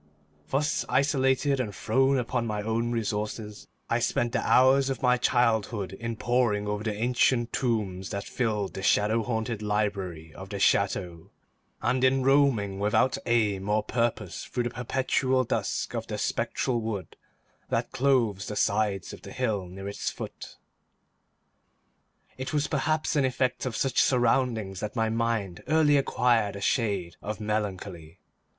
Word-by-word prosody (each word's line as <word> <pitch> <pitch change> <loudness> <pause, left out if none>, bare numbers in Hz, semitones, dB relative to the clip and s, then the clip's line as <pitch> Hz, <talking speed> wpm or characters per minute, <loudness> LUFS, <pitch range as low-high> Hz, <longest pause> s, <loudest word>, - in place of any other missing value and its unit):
Thus 145 +3 0
isolated, 135 0 +2
and 105 -6 -3
thrown 135 +8 +2
upon 120 -1 -1
my 105 -1 -2
own 115 +2 -1
resources, 105 -1 -3 0.2
I 115 - +1
spent 120 0 0
the - - 0
hours 135 +1 +4
of 135 - -4
my 125 0 +4
childhood 110 -5 +1
in 115 +3 -4
poring 120 -3 +1
over 105 0 -2
the 110 -2 -2
ancient 120 +1 +1
tomes 100 -7 -1
that 100 0 -3
filled 105 -5 -2
the 95 - -5
shadow 105 +3 +3
haunted 110 -1 -2
library 100 -6 -2
of 95 +1 -10
the 100 - -4
chateau, 95 -4 +1 0.5
and 130 0 +1
in 130 0 +3
roaming 130 -8 +3
without 105 +5 +2
aim 105 -4 +1
or 105 0 +2
purpose 115 -4 -2
through 125 - -2
the 120 - -1
perpetual 130 +1 0
dusk - - -2
of - - -4
the - - -4
spectral 120 -3 -1
wood 105 -6 -5 0.5
that - - -1
clothes 120 -7 +1
the 105 - -4
sides 100 -2 0
of - - -10
the - - -10
hill 110 -7 -1
near 95 +2 -8
its 100 - -3
foot. - - -8 1.8
It 130 +3 -4
was 150 -1 +1
perhaps 155 +2 0
an 145 - +3
effect 130 0 0
of 120 - -4
such 135 -2 +2
surroundings 115 -6 +1
that 105 - -5
my 110 -1 +1
mind 115 -5 -1
early 155 -1 +4
acquired 120 -6 +2
a 100 - -7
shade 100 -7 0
of 105 +1 -5
melancholy. 100 -6 -4
115 Hz, 150 wpm, -27 LUFS, 105-130 Hz, 1.8 s, hours